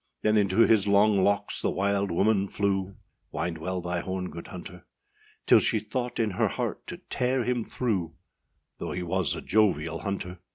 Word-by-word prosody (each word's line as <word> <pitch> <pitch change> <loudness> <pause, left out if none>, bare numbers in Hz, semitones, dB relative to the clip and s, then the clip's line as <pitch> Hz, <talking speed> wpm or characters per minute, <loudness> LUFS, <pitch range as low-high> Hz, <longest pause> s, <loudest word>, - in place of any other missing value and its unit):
â - - -52 0.2
Then 110 0 +3
into 100 +1 +3
his 110 -3 +4
long 100 -1 +4
locks 100 +1 +1
the - - +1
wild 100 0 0
woman 100 +3 +2
flew, 100 -1 -1 0.4
Wind 85 +1 -3
well 90 +3 -3
thy 90 0 -2
horn, 95 +1 -4
good 85 +2 -8
hunter; 90 0 -9 0.6
Till - - +7
she - - +1
thought 120 +4 -3
in 110 -2 +1
her 90 - +1
heart - - -4
to - - -6
tear 125 0 +1
him 125 -1 0
through, 95 -10 -2 0.6
Though - - -4
he 90 0 -3
was 90 -2 0
a - - -6
jovial 90 -7 +1
hunter. 95 -3 -4
100 Hz, 180 wpm, -27 LUFS, 90-110 Hz, 0.6 s, Till